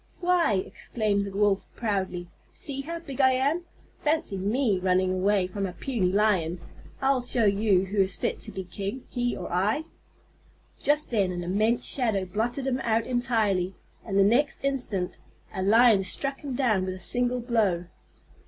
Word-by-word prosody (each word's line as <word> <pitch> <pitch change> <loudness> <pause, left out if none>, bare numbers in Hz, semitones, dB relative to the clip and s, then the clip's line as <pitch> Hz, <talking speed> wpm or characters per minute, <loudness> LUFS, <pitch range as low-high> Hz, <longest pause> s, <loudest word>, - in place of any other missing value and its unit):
"Why," 345 - +2
exclaimed 205 -3 -1
the 200 - -6
Wolf 205 -1 +2
proudly, 190 -5 -2 0.2
"see 280 -7 -5
how 335 +4 -5
big 285 -5 -4
I 260 0 +5
am! 285 +7 0 0.3
Fancy 310 -8 0
me 205 +2 +1
running 185 0 +2
away 190 +1 +2
from 195 +2 -3
a 180 - -7
puny 200 -4 -1
Lion! 185 -5 +1 0.4
I'll 265 -1 +3
show 240 -2 +1
him 200 -2 +3
who 195 +1 +1
is 190 -1 +1
fit - - -2
to - - -7
be 190 - -5
king, 200 +7 -5
he 245 -1 -1
or 175 - -6
I." 210 - +1 1.0
Just 295 -1 +2
then 200 -5 +1
an 175 -1 -4
immense 215 +6 +1
shadow 220 -8 +1
blotted 230 +8 -2
him 265 -1 0
out 225 0 +1
entirely, 220 -7 0 0.3
and 195 -3 -2
the 200 - +6
next 245 +8 +2
instant 245 -10 -2 0.3
a 190 - -3
Lion 220 +1 +5
struck 275 +8 -1
him 275 -3 -4
down 225 -8 +2
with 185 0 -3
a - - -10
single 245 +6 +2
blow. 215 -8 +1
215 Hz, 170 wpm, -27 LUFS, 190-255 Hz, 1.0 s, the